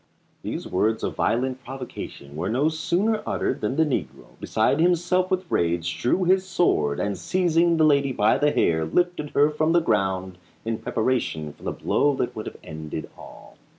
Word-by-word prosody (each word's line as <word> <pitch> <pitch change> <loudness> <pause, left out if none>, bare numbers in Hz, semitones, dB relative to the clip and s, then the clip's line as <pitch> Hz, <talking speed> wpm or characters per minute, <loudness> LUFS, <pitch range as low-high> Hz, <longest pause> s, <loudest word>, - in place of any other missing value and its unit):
These - - -5
words 110 +4 0
of - - -2
violent 130 +2 0
provocation 125 - -8
were 90 +5 -2
no 135 +7 +2
sooner 180 +7 0
uttered - - -2
than 105 +5 -1
the 160 +2 +3
negro, 70 - -4
beside 110 +7 +1
himself 180 +2 +2
with 185 -1 0
rage, 85 - 0
drew 180 +10 +2
his 185 +1 +3
sword, 80 - +1
and 100 -1 -1
seizing 170 - +2
the 155 - +4
lady 140 -2 +3
by 110 +1 +2
the 150 0 +3
hair, 80 - +2
lifted 175 - 0
her 145 +2 +4
from 155 +2 +1
the 175 - +5
ground 95 - -1 0.3
in 115 0 -2
preparation 110 - -1
for - - -24
the - - -3
blow 145 -1 +1
that 125 -2 -2
would 110 - -6
have - - -8
ended 80 -2 -7
all. - - -14
130 Hz, 180 wpm, -24 LUFS, -, 0.3 s, the